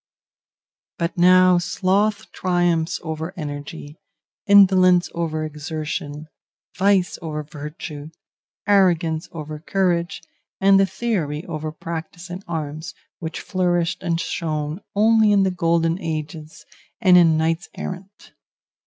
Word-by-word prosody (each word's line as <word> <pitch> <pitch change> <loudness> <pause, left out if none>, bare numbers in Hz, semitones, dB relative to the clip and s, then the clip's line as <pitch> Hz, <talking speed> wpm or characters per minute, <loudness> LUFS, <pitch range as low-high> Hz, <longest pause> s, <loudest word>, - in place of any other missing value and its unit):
But 170 +2 -2
now 180 0 +6
sloth 200 +4 0
triumphs 175 -3 0
over 160 0 -5
energy, 145 0 -7 0.5
indolence 185 -3 +5
over 160 -2 -2
exertion, 150 -1 -5 0.5
vice 195 -1 +2
over 155 -2 -4
virtue, 150 0 -8 0.6
arrogance 175 -5 +2
over 155 -2 -7
courage, 175 +1 -1 0.4
and 195 0 +5
theory 170 -11 -2
over 155 0 -5
practice 170 +3 -7
in 180 +2 -6
arms, 155 -1 -5 0.2
which 160 -2 -5
flourished 175 -3 0
and 170 -2 -1
shone 155 0 -3
only 220 0 +4
in 200 -1 +4
the 190 - +1
golden 170 0 +1
ages 155 0 -6 0.3
and 185 -5 +5
in 165 -3 +6
knights 165 +2 -1
errant. 190 +2 -8
170 Hz, 110 wpm, -22 LUFS, 155-185 Hz, 0.6 s, now